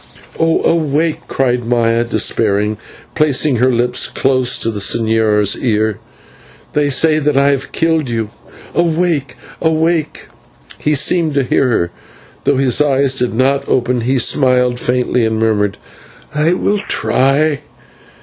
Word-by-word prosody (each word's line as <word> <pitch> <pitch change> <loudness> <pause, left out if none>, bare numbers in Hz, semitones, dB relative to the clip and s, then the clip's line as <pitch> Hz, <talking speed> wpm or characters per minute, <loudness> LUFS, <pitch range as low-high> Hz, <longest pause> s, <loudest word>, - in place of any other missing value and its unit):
"Oh! 165 0 +1
awake," 155 -1 0
cried 125 -2 -1
Maya 115 0 +1
despairingly, 105 -2 0 0.4
placing 150 -2 +1
her 125 +3 +2
lips 125 +1 0
close 130 -2 +1
to 115 - 0
the 105 - -6
señor's 110 -1 +1
ear. 110 -3 0 0.7
"They 145 -1 +1
say 155 +3 +3
that 150 -2 0
I 140 +1 +4
have 140 -1 -2
killed 160 -4 0
you, 115 -2 -3 0.4
awake, 170 -4 0 0.3
awake!" 160 0 -1 0.5
He 150 0 0
seemed 155 +2 +2
to 140 - +2
hear 130 +1 +1
her, 100 -7 0
for, 85 - -26
though - - 0
his 135 +1 +2
eyes 135 -2 +1
did 125 -2 -1
not 135 +3 0
open, 125 -1 0
he 130 +3 0
smiled 125 -1 +2
faintly 125 0 0
and 110 0 0
murmured, 105 -2 0 0.6
"I 150 +3 +1
will 205 +3 0
try." 145 -5 0
130 Hz, 140 wpm, -15 LUFS, 115-150 Hz, 0.7 s, I